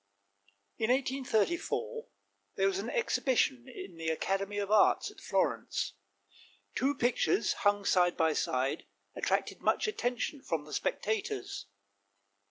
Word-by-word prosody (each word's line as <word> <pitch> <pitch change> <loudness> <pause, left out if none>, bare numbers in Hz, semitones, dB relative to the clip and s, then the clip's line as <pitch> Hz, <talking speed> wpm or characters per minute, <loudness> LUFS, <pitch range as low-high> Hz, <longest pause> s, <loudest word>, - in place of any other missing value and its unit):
In 220 - +1
1834 270 - 0 0.5
there - - +2
was 390 0 +1
an - - -3
exhibition 265 - +1
in 260 - -9
the 165 0 -2
Academy 195 +5 -1
of 200 0 -2
Arts 215 -1 +4
at - - -16
Florence. 100 - 0 0.8
Two 275 +3 +1
pictures 250 +9 +2
hung 205 -2 +1
side 180 -2 +3
by 160 -1 +3
side 130 -1 -1 0.3
attracted - - -1
much - - +2
attention 265 - -2
from 160 - -2
the 150 - -10
spectators. 165 - -2
220 Hz, 120 wpm, -31 LUFS, 175-270 Hz, 0.8 s, Arts